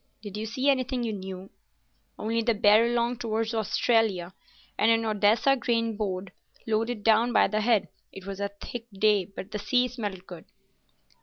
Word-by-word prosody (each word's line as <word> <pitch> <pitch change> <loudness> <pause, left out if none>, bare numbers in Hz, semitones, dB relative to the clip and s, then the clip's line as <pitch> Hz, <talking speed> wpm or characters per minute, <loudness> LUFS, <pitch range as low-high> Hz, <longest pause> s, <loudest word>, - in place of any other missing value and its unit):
"Did 205 -2 -7
you 215 +1 -4
see 260 +5 -2
anything 260 -2 +1
you 225 -2 -2
knew?" 190 -1 -8 0.7
"Only 230 +2 -1
the 230 0 +1
Barralong 235 +4 +3
outwards 225 -1 -2
to 230 - -2
Australia, 210 -4 +1 0.4
and 220 - +2
an 225 0 +3
Odessa 215 +5 +3
grain 230 -3 -1
boat 190 -3 -3 0.3
loaded 225 0 -1
down 225 +2 +4
by - - +5
the 215 +2 -1
head. 220 -2 +2 0.2
It 195 -1 -11
was 195 0 -6
a 200 - -1
thick 225 +3 -8
day, 205 -1 +2
but 195 +1 -10
the 210 - -4
sea 250 +4 +2
smelt 205 -6 -6
good." 175 -4 -11
220 Hz, 170 wpm, -27 LUFS, 200-235 Hz, 0.7 s, by